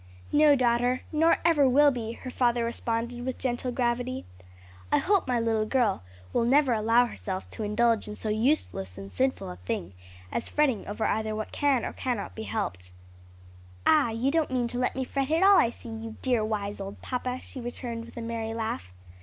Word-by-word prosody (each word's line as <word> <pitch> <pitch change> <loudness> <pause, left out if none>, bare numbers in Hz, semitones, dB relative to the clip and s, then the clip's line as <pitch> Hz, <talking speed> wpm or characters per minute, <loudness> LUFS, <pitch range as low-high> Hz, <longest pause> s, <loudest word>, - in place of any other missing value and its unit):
"No, 295 -1 +6
daughter, 245 0 +2
nor 325 +1 +4
ever 295 -5 +5
will 290 +3 +6
be," 230 -3 -4
her 255 +2 -8
father 240 -2 +2
responded 235 +1 -3
with 260 0 -3
gentle 250 0 -2
gravity. 245 +1 -1 0.7
"I - - +5
hope 395 -5 +2
my 250 -2 +1
little 225 -2 +1
girl 235 -6 +1 0.3
will - - +2
never 265 +1 +4
allow 230 +2 +4
herself 190 -5 -5
to - - -7
indulge 225 +2 +2
in 210 - -6
so 215 - -6
useless 215 - 0
and 100 0 -8
sinful 260 - 0
a 90 - -9
thing 90 0 -4 0.4
as - - -2
fretting 275 -8 +1
over 210 +2 -2
either 220 0 0
what 215 0 -4
can 280 -4 +1
or - - -2
what - - -13
cannot 245 -5 -2
be 220 - -7
helped." 90 - -4 0.9
"Ah, 295 -6 +5
you 230 +5 0
don't 320 -1 +1
mean 250 -2 0
to 245 - -3
let 250 - 0
me 265 - -1
fret 275 +1 -2
at 325 +4 +3
all, 395 0 +8
I 230 - +4
see, 240 - -10
you 225 0 -6
dear, 245 -4 +2
wise 205 -2 -3
old 195 0 -8
papa," 250 0 -3
she 260 - -9
returned 235 -1 -5
with - - -14
a 235 - -4
merry 225 -1 -3
laugh. 220 - -3
240 Hz, 200 wpm, -28 LUFS, 220-260 Hz, 0.9 s, all